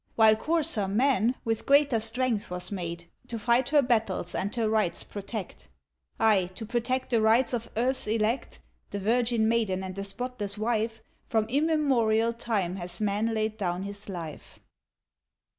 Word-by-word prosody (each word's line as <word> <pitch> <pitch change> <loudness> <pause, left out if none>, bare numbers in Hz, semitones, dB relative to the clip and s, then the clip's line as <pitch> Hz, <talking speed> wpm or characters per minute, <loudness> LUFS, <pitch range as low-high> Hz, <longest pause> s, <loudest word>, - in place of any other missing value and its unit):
While 220 -1 +6
coarser 300 -5 +1
man, 240 +2 +2
with 225 -1 -2
greater 280 -4 +4
strength 225 0 0
was 180 +2 -4
made 170 -3 -5 0.2
To 235 - -4
fight 240 +3 +2
her 290 -1 +4
battles 220 -8 0
and 200 +4 -2
her 230 -2 +1
rights 215 -5 +1
protect. 200 - -7 0.5
Ay! 200 -5 +3
to 220 - -6
protect 245 +3 -1
the 230 -2 +3
rights 230 +4 +3
of 235 -1 -2
earth's 255 +2 +1
elect 220 +3 -1 0.3
(The 205 - -4
virgin 230 +2 +1
maiden 215 -5 +1
and 185 0 -5
the 195 +1 -5
spotless 205 0 -4
wife) 225 0 -1 0.2
From 220 -2 +1
immemorial 255 -6 +2
time 205 -6 -2
has 175 -1 -4
man 215 +2 0
laid 215 0 -1
down 180 -2 -2
his 200 +1 -6
life. 165 -5 -8
220 Hz, 155 wpm, -28 LUFS, 200-240 Hz, 0.5 s, While